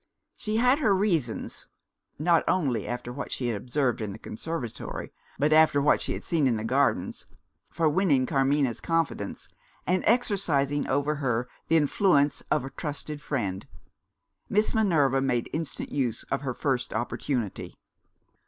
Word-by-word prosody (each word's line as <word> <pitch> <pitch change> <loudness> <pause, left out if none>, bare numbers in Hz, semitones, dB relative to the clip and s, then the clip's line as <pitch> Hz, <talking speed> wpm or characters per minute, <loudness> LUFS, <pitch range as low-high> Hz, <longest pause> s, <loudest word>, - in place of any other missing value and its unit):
She 215 0 -2
had 250 +5 +4
her 215 -10 +3
reasons 170 - -1 0.5
not 165 +2 +3
only 130 - +1
after 120 0 -4
what 140 - -6
she 125 -2 -1
had 105 -4 -2
overheard 125 -3 +1
in 105 -2 -3
the - - -8
conservatory, 130 -1 -6 0.2
but 150 +3 +3
after 155 -2 +5
what 145 +1 +3
she - - -1
had - - -6
seen 155 -5 +1
in 120 - +2
the 110 - -3
Gardens 135 +4 0 0.4
for 165 - +1
winning 150 -5 +3
Carmina's 135 -2 +1
confidence, 165 -11 -2 0.4
and 180 +1 +1
exercising 145 - +1
over 145 +2 0
her 125 -4 -1 0.2
the 165 - +4
influence 145 -1 +3
of 130 - +1
a 135 - -7
trusted 150 +1 -5
friend. 100 -11 -3 0.8
Miss 210 +2 +2
Minerva 155 - +3
made 125 -3 0
instant 160 -2 -4
use 130 -6 -1
of - - 0
her 130 -3 -3
first 130 -6 -1
opportunity. 120 -1 -3
140 Hz, 150 wpm, -27 LUFS, 125-165 Hz, 0.8 s, after